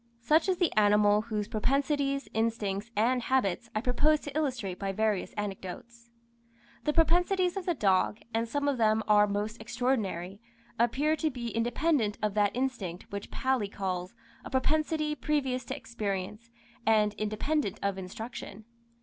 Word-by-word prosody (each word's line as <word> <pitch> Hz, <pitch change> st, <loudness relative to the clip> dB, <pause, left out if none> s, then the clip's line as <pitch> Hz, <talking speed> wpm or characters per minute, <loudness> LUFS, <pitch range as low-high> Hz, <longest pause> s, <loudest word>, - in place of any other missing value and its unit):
Such 315 Hz, +8 st, +3 dB
is 370 Hz, -, +2 dB
the 350 Hz, -2 st, +1 dB
animal 210 Hz, 0 st, +5 dB
whose 215 Hz, -2 st, -3 dB
propensities, 275 Hz, +5 st, 0 dB
instincts, 220 Hz, -2 st, -1 dB
and 245 Hz, +4 st, +2 dB
habits, 235 Hz, -7 st, 0 dB
I 215 Hz, -, +1 dB
propose 290 Hz, +5 st, +3 dB
to 290 Hz, -1 st, -8 dB
illustrate 250 Hz, -12 st, -1 dB
by 195 Hz, -1 st, -1 dB
various 215 Hz, -1 st, 0 dB
anecdotes. 210 Hz, +4 st, -6 dB, 0.8 s
The 300 Hz, -, +3 dB
propensities 355 Hz, +3 st, +3 dB
of 385 Hz, -2 st, -4 dB
the 350 Hz, -, +2 dB
dog, 195 Hz, -3 st, +2 dB, 0.2 s
and 230 Hz, +1 st, 0 dB
some 285 Hz, +3 st, -1 dB
of 275 Hz, -3 st, +1 dB
them 220 Hz, 0 st, +3 dB
are 210 Hz, -1 st, +6 dB
most 210 Hz, +2 st, -3 dB
extraordinary, 220 Hz, -6 st, -2 dB, 0.4 s
appear 270 Hz, +7 st, +2 dB
to 315 Hz, -, +1 dB
be 245 Hz, -4 st, -5 dB
independent 240 Hz, -1 st, +1 dB
of 210 Hz, -1 st, +1 dB
that 205 Hz, 0 st, +2 dB
instinct 235 Hz, -9 st, -3 dB
which 200 Hz, 0 st, -5 dB
Paley 260 Hz, -5 st, 0 dB
calls, 185 Hz, 0 st, -3 dB, 0.3 s
"a -, -, -7 dB
propensity 305 Hz, +3 st, +1 dB
previous 270 Hz, -4 st, -1 dB
to 260 Hz, -, -4 dB
experience, 215 Hz, -4 st, -4 dB, 0.3 s
and 215 Hz, -2 st, +3 dB
independent 215 Hz, +3 st, -1 dB
of 200 Hz, -1 st, 0 dB
instruction." 210 Hz, +2 st, -7 dB
230 Hz, 150 wpm, -30 LUFS, 205-275 Hz, 0.8 s, are